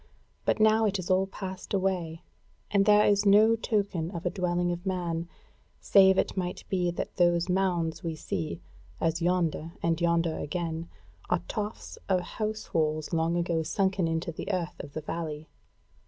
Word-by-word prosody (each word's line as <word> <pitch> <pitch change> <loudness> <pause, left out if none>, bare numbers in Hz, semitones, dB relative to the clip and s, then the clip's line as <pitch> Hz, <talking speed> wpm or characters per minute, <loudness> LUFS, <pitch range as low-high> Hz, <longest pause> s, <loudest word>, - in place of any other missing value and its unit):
But - - +1
now 220 +1 +5
it 200 -1 0
is 185 -1 -3
all 190 +1 +3
passed 190 0 -5
away, 180 -4 -1 0.5
and 200 -1 +3
there 210 0 +6
is 205 0 +3
no 210 +3 +6
token 200 -7 -1
of 175 -1 -7
a 175 - +1
dwelling 175 -2 0
of 175 0 -4
man, 170 -3 -2 0.5
save 190 -1 +5
it - - +1
might 180 -2 -3
be 180 -2 +1
that 170 - -5
those 175 0 +3
mounds 180 -2 0
we 165 -2 -3
see, 85 - -4 0.4
as 165 +1 0
yonder, 170 -2 0
and 170 0 +1
yonder 170 -1 +1
again, 165 0 -3 0.4
are 180 -1 +1
tofts 210 0 -5
of 185 -1 +3
house 215 +3 -5
walls 155 0 0
long 165 +1 +1
ago 170 -1 0
sunken 190 +1 0
into 165 +1 -2
the 190 +5 -5
earth 180 -2 -2
of 140 - -8
the 155 - -4
valley. 155 -1 -5
175 Hz, 170 wpm, -28 LUFS, 165-195 Hz, 0.5 s, there